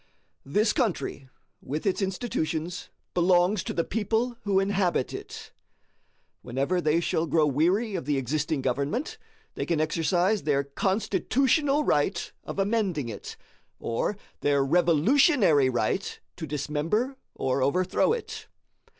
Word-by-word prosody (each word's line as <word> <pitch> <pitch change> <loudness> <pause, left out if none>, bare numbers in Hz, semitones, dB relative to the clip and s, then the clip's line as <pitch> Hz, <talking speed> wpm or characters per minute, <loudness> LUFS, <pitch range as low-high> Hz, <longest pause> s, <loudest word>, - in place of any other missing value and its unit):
This 210 +9 +2
country, 155 - -2 0.3
with 150 +4 -4
its 195 0 +1
institutions, 180 -4 -3 0.2
belongs 180 +2 +3
to - - -2
the 165 - 0
people 225 +5 -1
who 195 -1 +3
inhabit 195 -7 0
it. - - -8 0.9
Whenever 140 +9 -1
they 155 0 +2
shall 170 -1 0
grow 160 -1 +3
weary 180 - +1
of 180 -8 -3
the 145 -1 0
existing 145 +2 -1
government, 140 - -2 0.3
they - - -3
can 170 -3 0
exercise 175 +6 +1
their 140 -2 +1
CONSTITUTIONAL 230 - +1
right 150 - 0
of - - -7
amending 195 - 0
it, 105 - -8 0.4
or 115 - -2 0.2
their 140 -1 +2
REVOLUTIONARY 175 - +4
right 125 - -1 0.2
to 160 - -6
dismember 150 - -1 0.2
or 130 +1 0
overthrow 180 - +2
it. 465 0 -4
175 Hz, 125 wpm, -27 LUFS, 145-205 Hz, 0.9 s, REVOLUTIONARY